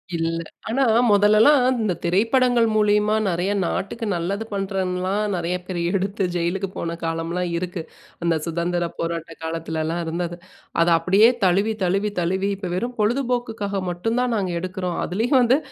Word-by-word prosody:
இல்ல. 165 0 -1 0.3
ஆனா 265 +4 +2 0.3
முதல்லலாம் 215 +7 +5 0.2
இந்த 200 -4 +1
திரைப்படங்கள் 230 +6 +3
மூலியமா 210 0 +3
நிறைய 180 +2 0
நாட்டுக்கு 225 +6 -3
நல்லது 185 +5 -2
பண்ணுறன்லாம், 190 0 -1
நிறைய 175 +1 -1
பேர் 180 -1 -4 0.2
எடுத்து, 195 +1 -1
ஜெயிலுக்கு 180 +3 -1
போன 170 0 -3
காலம்லாம் 165 +2 -2
இருக்கு. 180 0 -4 0.4
அந்த 170 -1 +2
சுதந்திரப் 170 +1 -2
போராட்ட 165 -1 -3
காலத்துலலாம் 160 0 -2
இருந்தது, 170 +1 -3 0.4
அத 170 - +3
அப்படியே 200 +7 +5 0.2
தழுவி, 200 +5 +2
தழுவி, 195 +3 +1
தழுவி 190 +3 0
இப்ப 190 -2 -5
வெறும் 240 +6 -3
பொழுதுபோக்குக்காக 225 -4 -1
மட்டும் 225 +7 -1
தான் 250 -1 0
நாங்க 185 -4 -1
எடுக்கிறோம்! 185 -1 -3
அதிலயும் 235 +8 +2
வந்து, 245 +2 +4
190 Hz, 135 wpm, -22 LUFS, 170-215 Hz, 0.4 s, முதல்லலாம்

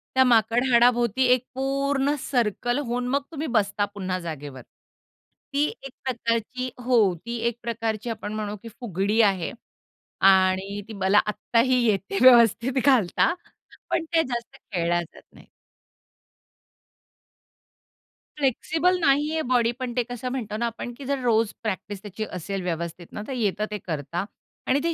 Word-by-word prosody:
त्या 260 - +6
माकड 230 0 +3
हाडाभोवती 240 0 +4
एक 250 -1 0
पूर्ण 275 +1 0
सर्कल 240 0 0
होऊन 245 +1 -2
मग 275 +3 +1
तुम्ही 310 0 -4
बसता 205 0 +1
पुन्हा 185 -2 -3
जागेवर. 145 -6 -7 0.9
ती 285 +1 +3 0.2
एक 270 - -7
प्रकारची 240 +1 -2 0.2
हो 250 -1 +3 0.3
ती 235 0 -3
एक 235 0 -2
प्रकारची 225 -1 -3
आपण 210 -2 -5
म्हणू 210 -1 -3
की 230 - -8
फुगडी 205 0 +1
आहे 195 -5 +2 0.8
आणि 190 +1 +2
ती 225 - -8
मला 195 +1 +3
आत्ताही 240 +4 +2
येते 195 -2 0
व्यवस्थित 240 0 +6
घालता, 255 - +3 0.6
पण 335 - +1
ते 325 -1 +4
जास्त 240 -2 -5
खेळल्या 175 -3 -1
जात 170 - -16
नाहीत. - - -17 2.9
फ्लेक्सिबल 320 +6 +1
नाहीये 300 +1 +2
बॉडी, 245 -3 +2
पण 250 0 -5
ते 245 - +3
कसं 245 +1 -5
म्हणतो 220 -5 -4
ना 235 - -1
आपण 235 +1 -5
की 275 - -9
जर 280 0 -1
रोज 225 -2 +2
प्रॅक्टिस 205 -1 -4
त्याची 215 +1 -5
असेल 190 +2 -4
व्यवस्थित 170 0 -4
ना, - - -6
तर 270 - -4
येतं 210 -3 0
ते 210 - -2
करता 165 +3 -3 0.4
आणि 270 - +3
ते 335 - +1
230 Hz, 145 wpm, -25 LUFS, 200-255 Hz, 2.9 s, त्या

